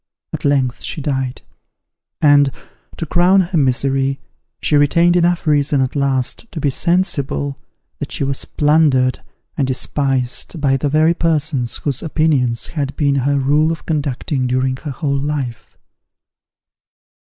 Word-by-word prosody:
At - - -5
length 135 -3 +1
she - - -4
died; 135 -3 -3 0.8
and, 145 -2 +5 0.5
to 165 - -3
crown 180 +4 +4
her 175 -1 -2
misery, 135 +1 0 0.4
she 150 - 0
retained 170 +4 +4
enough 175 0 +2
reason 145 -2 +2
at 130 +1 -1
last 140 - -1
to 160 - -5
be 145 -2 0
sensible 145 -5 0 0.4
that - - -5
she - - -2
was 135 -1 -1
plundered 145 -4 +2 0.4
and 135 - 0
despised 130 +3 -1
by 135 -2 +2
the 140 +2 -1
very 155 +3 +3
persons 155 -7 0
whose 140 -4 -3
opinions 145 -7 +1
had 140 -3 -3
been 145 -2 +1
her 140 +1 +1
rule 145 +4 +2
of 165 - -6
conduct 145 -5 -2 0.2
during 130 +1 0
her 150 - -7
whole 140 0 -2
life. 140 -5 -4
140 Hz, 140 wpm, -18 LUFS, 135-155 Hz, 0.8 s, and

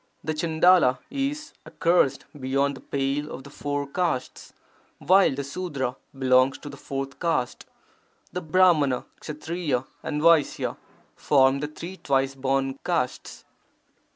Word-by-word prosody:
[The 155 - -1
Chandala 160 -3 +4
is 290 +3 -3
accursed 165 -5 +1
beyond 140 +2 0
the - - -11
pale 140 +2 -2
of 135 - -7
the 140 - -12
four 145 0 -3
castes, 140 -3 -3 0.5
while 190 -6 +4
the 140 - -3
Sudra 140 -4 -3 0.2
belongs 130 0 +3
to 145 - -9
the 140 - -9
fourth 135 -1 -5
caste. 160 -8 -1 0.7
The 180 - -3
Brahmana, 160 -6 +3
Ksatriya, 150 -4 -3 0.2
and 150 - -3
Vaisya 165 -2 +3 0.4
form 135 -1 +3
the 150 - -2
three 170 +5 -8
twice 135 -3 0
born 135 0 -1
castes. 165 -8 -2
145 Hz, 125 wpm, -25 LUFS, 135-170 Hz, 0.7 s, Chandala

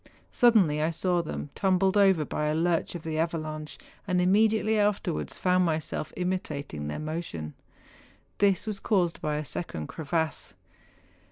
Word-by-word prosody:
Suddenly 200 - +4
I 155 - +2
saw 175 +1 +1
them 150 -3 -6
tumbled 190 0 +2
over 190 -6 +4
by 150 - -2
a 150 - +1
lurch 170 +1 0
of 170 - -6
the 160 -1 -2
avalanche, 155 -2 -3 0.3
and 180 -2 +1
immediately 215 +3 +3
afterwards 205 - 0
found 185 0 +3
myself 155 -2 -1
imitating 150 - -3
their 75 - -4
motion. 155 - -5 0.9
This 200 0 +3
was 210 -3 -3
caused 180 -6 +1
by 150 -1 -1
a 150 0 -3
second 105 - -4
crevasse. 160 - -3
170 Hz, 145 wpm, -28 LUFS, 155-190 Hz, 0.9 s, Suddenly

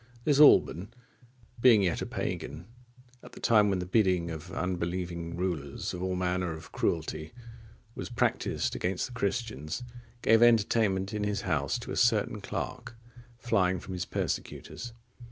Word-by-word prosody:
This 145 0 +2
Alban, 105 - +6 0.7
being 115 -4 +6
yet 90 -3 0
a - - -3
pagan, 75 +5 -4 0.6
at - - -14
the - - -11
time 105 -3 +4
when 95 - +1
at - - -3
the - - -4
bidding 90 -4 +2
of 80 +3 -8
unbelieving 85 -2 -3
rulers 85 -6 -3
all 90 +1 -2
manner 90 -1 -1
of 80 +1 -10
cruelty 80 -1 -2 0.6
was - - -6
practised 120 - 0
against 90 0 -1
the 125 - -9
Christians, 100 - -3 0.4
gave 115 +1 +5
entertainment 110 -4 +3
in 105 -1 -2
his 105 -1 -1
house 80 - 0
to 120 - -8
a - - -3
certain 110 -3 +2
clerk,(52) 120 0 -8
flying 95 -5 +2
from 95 - -8
his 90 -1 -3
persecutors. 120 +6 -4
95 Hz, 150 wpm, -29 LUFS, 85-115 Hz, 0.7 s, Alban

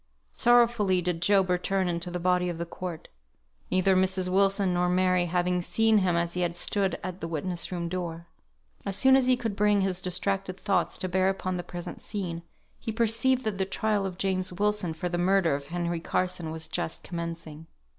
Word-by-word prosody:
Sorrowfully 235 -6 +3
did 175 -1 -1
Job 195 +1 +4
return 185 +1 0
into 170 0 -1
the 175 0 -4
body 180 0 +1
of 170 - -4
the 170 - -3
court; 170 -1 -7 0.6
neither 185 +1 +3
Mrs. 185 0 +1
Wilson 195 0 +2
nor 180 0 +1
Mary 185 -1 +2
having 180 +1 0
seen 220 +4 +3
him 180 -3 +1
as 170 0 0
he 180 - -2
had 170 -1 0
stood 195 +1 0
at 185 0 -6
the 165 - -3
witness 170 +3 -3
room 175 -2 -3
door. 170 -2 -4 0.6
As 195 - -3
soon 265 +4 +6
as 265 -1 +3
he 255 -1 +4
could 225 -4 -3
bring 205 0 +3
his 190 -1 -1
distracted 185 +1 -2
thoughts 200 -2 0
to 185 - -3
bear 185 +1 +2
upon 185 -1 -2
the - - -2
present 175 0 -7
scene, 180 -5 -4 0.4
he 225 - -4
perceived 230 +3 +2
that 215 -4 -2
the 190 - +2
trial 210 +1 0
of 180 -2 -7
James 190 -1 0
Wilson 200 -3 -1
for 180 - -3
the 175 0 -2
murder 185 -3 +3
of 140 0 -4
Henry 170 0 -2
Carson 180 -1 -2
was 160 0 -5
just 160 - -3
commencing. 165 -2 -6
185 Hz, 195 wpm, -27 LUFS, 175-195 Hz, 0.6 s, soon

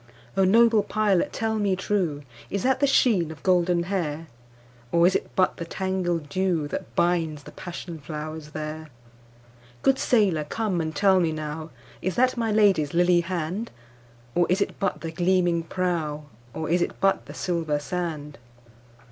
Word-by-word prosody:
O 195 - +3
noble 225 +2 +5
pilot 205 -3 +1
tell 220 -1 -1
me 200 -2 +1
trueIs 175 - -3
that 265 0 +2
the 280 - +3
sheen 215 - +3
of 160 - -10
golden 175 -2 +3
hair? 165 -4 -2 0.7
Or 170 0 +4
is 190 - +4
it - - -1
but 185 - +2
the - - -4
tangled 175 -3 -2
dewThat 170 -3 -1
binds 165 -4 +1
the - - -11
passion 170 -2 -7
flowers 155 +1 -6
there? 155 +1 -6 0.9
Good 270 0 +3
sailor 195 -10 +2
come 190 +1 -1
and 160 0 -4
tell 195 -2 +4
me 165 -3 +1
nowIs 155 +1 -6
that 255 +1 +3
my 230 -2 -1
Lady's 195 -9 +3
lily 175 0 +4
hand? 180 +5 -3 0.6
Or 175 -1 +2
is 185 +3 +2
it 200 - -2
but 195 -2 -1
the 165 - -4
gleaming 175 0 +2
prow, 165 -3 -2 0.3
Or 160 - -3
is 175 +2 +2
it - - -2
but 195 +1 +1
the - - -9
silver 165 -4 -1
sand? 150 -2 -4
175 Hz, 155 wpm, -25 LUFS, 155-195 Hz, 0.9 s, noble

